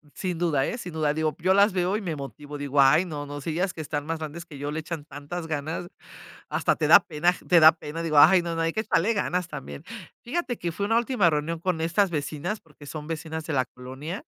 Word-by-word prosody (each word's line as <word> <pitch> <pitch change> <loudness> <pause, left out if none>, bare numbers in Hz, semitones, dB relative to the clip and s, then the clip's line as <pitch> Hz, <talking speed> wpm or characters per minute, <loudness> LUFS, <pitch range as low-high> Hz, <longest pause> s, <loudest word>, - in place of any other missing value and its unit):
Sin 180 -3 -3
duda, 155 -6 +1
¿eh?, - - -3
sin 180 -7 -7
duda. 155 -2 0
Digo, 155 0 -1
yo 185 +3 +3
las 200 +1 +5
veo 185 +2 +1
y - - -3
me 170 -7 -3
motivo, 145 +1 -8
digo: 145 0 +1
"Ay, 150 +6 +6
no, 150 -4 -5
no, 145 0 -6
si 155 - -4
ellas 180 +4 0
que 165 - -9
están 145 -1 -3
más 165 0 -2
grandes 160 +2 -6
que 145 -4 -11
yo 145 +1 -3
le 160 - -2
echan 155 -2 -6
tantas 150 +4 -7
ganas". 160 +3 -3 0.6
Hasta - - +1
te - - 0
da - - +9
pena 160 +2 0
aj 180 - -1
te 175 - +6
da 160 0 +9
pena. 160 0 -7
Digo: 155 -3 0
"Ay, 175 +5 +8
no, 170 -1 -3
no, 165 - -1
hay 165 0 0
que 220 - 0
echarle 220 0 +1
ganas 180 -4 -1
también". 70 - -8 0.4
Fíjate 255 -2 -2
que 170 - -3
fui 200 +5 -3
a - - -1
una 225 - +3
última 235 -7 +3
reunión 155 +2 -1
con 170 -2 -1
estas 170 +4 +2
vecinas, 155 +5 -3
porque 150 -2 -16
son 150 +1 -7
vecinas 160 0 -5
de 160 - -3
la 130 -2 +2
colonia, 130 +9 -8
160 Hz, 255 wpm, -26 LUFS, 150-180 Hz, 0.6 s, da